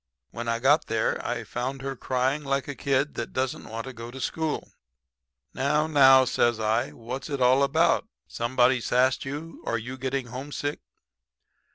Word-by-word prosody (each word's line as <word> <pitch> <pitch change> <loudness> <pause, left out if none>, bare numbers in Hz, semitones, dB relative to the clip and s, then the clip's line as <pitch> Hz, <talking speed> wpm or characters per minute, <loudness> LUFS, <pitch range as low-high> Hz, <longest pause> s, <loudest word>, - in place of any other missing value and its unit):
"When 120 0 -6
I 115 0 +1
got 145 +6 +3
there 110 -1 0
I 120 -1 -2
found 130 +6 -4
her 135 0 -3
crying 130 +4 -1
like 140 0 -1
a 145 - -3
kid 140 +1 0
that - - -5
don't 130 0 -2
want 115 +2 -5
to 130 - -7
go 115 0 -8
to 130 +2 -9
school. 160 +3 -3 0.8
"'Now, 150 +3 +1
now,' 135 -4 +6
says 120 -2 +1
I, 110 0 +1
'what's 125 +6 -7
it 140 -2 -2
all 130 +2 +4
about? 160 +9 +3 0.2
Somebody 125 +1 +2
sassed 130 +4 +2
you 150 +4 -6
or 115 - -1
you 125 +4 -7
getting 135 0 -2
homesick?' 145 +3 -4
130 Hz, 170 wpm, -26 LUFS, 120-140 Hz, 0.8 s, now